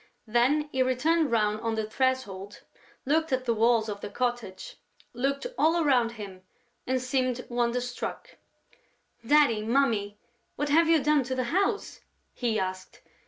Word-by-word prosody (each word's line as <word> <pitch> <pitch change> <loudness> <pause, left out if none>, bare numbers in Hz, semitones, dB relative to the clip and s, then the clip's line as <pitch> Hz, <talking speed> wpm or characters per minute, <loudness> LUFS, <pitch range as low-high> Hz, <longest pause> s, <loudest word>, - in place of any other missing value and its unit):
Then 250 +7 +2
he 260 - 0
turned 320 +3 +2
round 215 -2 +1
on 225 -1 -1
the 220 -1 -2
threshold, 215 -5 -2 0.4
looked 315 +3 +1
at 260 0 0
the 235 - +2
walls 225 0 +3
of 205 -1 -5
the - - -5
cottage, 245 - -4 0.4
looked 275 +3 -1
all 325 +2 +3
around 250 -7 +2
him 200 -4 -9 0.5
and 260 0 +1
seemed 255 -1 -1
wonderstruck: 245 0 -3 0.9
"Daddy, 275 -4 +4
Mummy, 220 -4 +1 0.4
what 290 +1 -2
have 325 +3 +4
you 320 -4 +4
done 300 0 +3
to 260 +1 -3
the 255 - 0
house?" 400 +2 0 0.3
he 230 -3 -1
asked. 185 0 -5
245 Hz, 145 wpm, -27 LUFS, 220-280 Hz, 0.9 s, Daddy